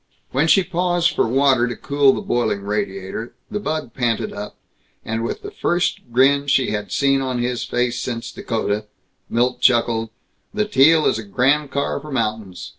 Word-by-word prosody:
When 140 +5 +2
she 195 +3 +5
paused 175 -1 +1
for - - +1
water 130 0 +3
to 120 - -4
cool 140 -1 +3
the - - -3
boiling 110 -4 -1
radiator, 100 +1 -4 0.2
the 210 - -2
bug 155 - -3
panted 120 -3 -1
up, 105 +1 -7 0.5
and 115 +1 -2
with 115 - -4
the 410 - -7
first 175 - 0
grin 140 +3 +3
she 135 -2 +2
had 105 -1 -4
seen 135 -1 +2
on 130 -2 -2
his 120 0 -2
face 125 0 -1
since 115 -2 -4
Dakota 105 -2 -2 0.4
Milt 125 +2 0
chuckled, 115 -2 +2 0.5
"The 210 0 +1
Teal 160 -4 +5
is - - +2
a - - -6
grand 135 +8 +1
car 140 0 -1
for 150 +1 -10
mountains. 110 -7 -3
125 Hz, 175 wpm, -21 LUFS, 115-145 Hz, 0.5 s, she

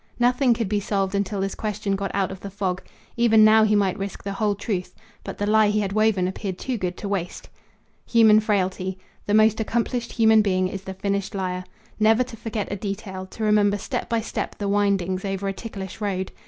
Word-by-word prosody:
Nothing 245 0 +3
could 225 -2 -2
be 205 +1 0
solved 195 -1 -1
until 200 0 -1
this 195 0 -2
question 205 -2 -2
got 195 0 -3
out 195 -1 0
of 190 - -8
the 200 - -7
fog. 190 -2 -2 0.4
Even 225 -2 +6
now 220 0 +6
he 215 -1 +3
might 200 -2 +1
risk 195 0 -5
the 200 - -3
whole 205 0 0
truth; 200 -3 -4 0.3
but - - -7
the 205 - -1
lie 215 0 +4
he 210 0 +1
had 195 -1 -2
woven 215 -4 +2
appeared 190 0 -4
too 260 +4 -3
good 180 -4 -3
to 205 - -5
waste. 195 -3 -4 0.6
Human 220 -2 +6
frailty. 190 -3 -1 0.3
The 205 - +2
most 215 0 +4
accomplished 235 +2 -1
human 220 -2 +5
being 185 -3 +1
is 195 +1 -7
the 190 - -6
finished 200 +1 -2
liar. 185 -1 -3 0.3
Never 220 +3 +4
to 250 -2 -10
forget 220 -3 -4
a - - -1
detail, 195 -1 -5
to 220 - -7
remember 210 -1 +3
step - - -4
by 230 0 +1
step 220 - -4
the 205 - -3
windings, 195 -2 +1
over 195 0 -3
a 195 - -1
ticklish 195 -2 -8
road. 190 -2 -2
200 Hz, 210 wpm, -24 LUFS, 190-215 Hz, 0.6 s, Even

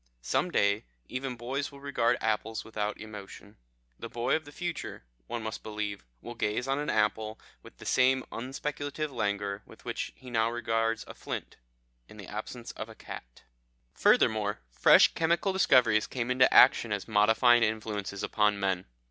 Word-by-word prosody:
Some 180 - 0
day 100 -8 +2 0.2
even 130 0 -3
boys 135 +5 -3
will 140 - -12
regard 140 -4 +1
apples 110 0 -1
without 105 -1 -3
emotion. 105 -1 -10 0.4
The - - -6
boy 120 0 0
of 160 - -3
the 145 - -11
future, 175 - -5 0.2
one 115 - -4
must 110 0 -5
believe, 105 -2 -4 0.2
will 120 - -6
gaze 115 +2 -1
on 135 +1 0
an 150 - -2
apple 110 +1 0 0.2
with - - -15
the - - -12
same 130 0 +3
unspeculative 145 +4 -4
languor 100 -3 -2
with - - -17
which - - -3
he 130 -1 -12
now 115 -1 +2
regards 115 -1 -1
a - - -8
flint" - - -6 0.5
in 110 - -14
the 100 - -9
absence 115 +4 -6
of 110 - -7
a 110 - -11
cat. - - -10 0.5
"Furthermore, 105 -1 +3
fresh - - +6
chemical 170 +4 +1
discoveries 125 - +4
came 125 -1 -3
into 130 0 +5
action 115 - +6
as 100 -1 -2
modifying 115 +3 +5
influences 105 -3 -2
upon 105 -1 +2
men. 95 -2 -1
115 Hz, 165 wpm, -29 LUFS, 105-130 Hz, 0.5 s, fresh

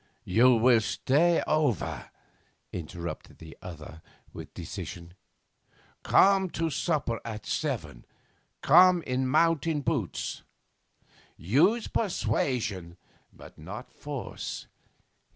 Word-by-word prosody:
'You 120 +6 +5
will 115 0 +5
stay 145 +9 +2
over,' 150 - 0 0.6
interrupted 85 0 -7
the 80 0 -12
other 80 -2 -10 0.3
with - - -9
decision. 85 0 -7 0.9
'Come 195 -1 +4
to 165 -1 0
supper 140 -6 -1
at 110 -2 -7
seven. - - -3 0.6
Come 180 +2 +6
in 130 +1 -1
mountain 165 +2 +2
boots. - - -2 1.0
Use 160 - +2
persuasion, 110 - -1 0.3
but - - -15
not 100 - -9
force. 145 -4 -6
125 Hz, 90 wpm, -28 LUFS, -, 1.0 s, Come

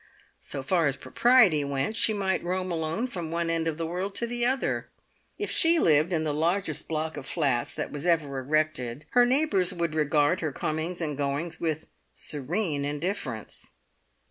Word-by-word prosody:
So 135 -2 -5
far 165 +2 +2
as 135 - 0
propriety 215 - +4
went, 140 +8 -1
she 225 - +3
might 195 -3 0
roam 185 +1 -2
alone 165 +7 -1
from 175 -10 -5
one 170 0 -1
end 165 0 0
of 160 -2 -1
the 165 - -2
world 185 +4 -3
to 235 - 0
the 240 0 -3
other. 260 +1 -1 0.5
If 415 - -3
she 330 +1 +4
lived 155 - +4
in 160 -3 +1
the 150 -2 -1
largest 165 +1 0
block 160 -1 -2
of 135 - -7
flats 135 -8 0
that - - -4
was 145 +4 -4
ever 150 -6 +1
erected, 145 -2 -1
her 245 0 +5
neighbours 215 - +2
would 170 -2 -1
regard 150 +2 +2
her 155 -3 -1
comings 160 +5 -3
and 150 -3 -2
goings 145 +4 -2
with 160 -2 -1 0.3
serene 150 +1 -2
indifference. 145 - -4
160 Hz, 175 wpm, -27 LUFS, 145-185 Hz, 0.5 s, her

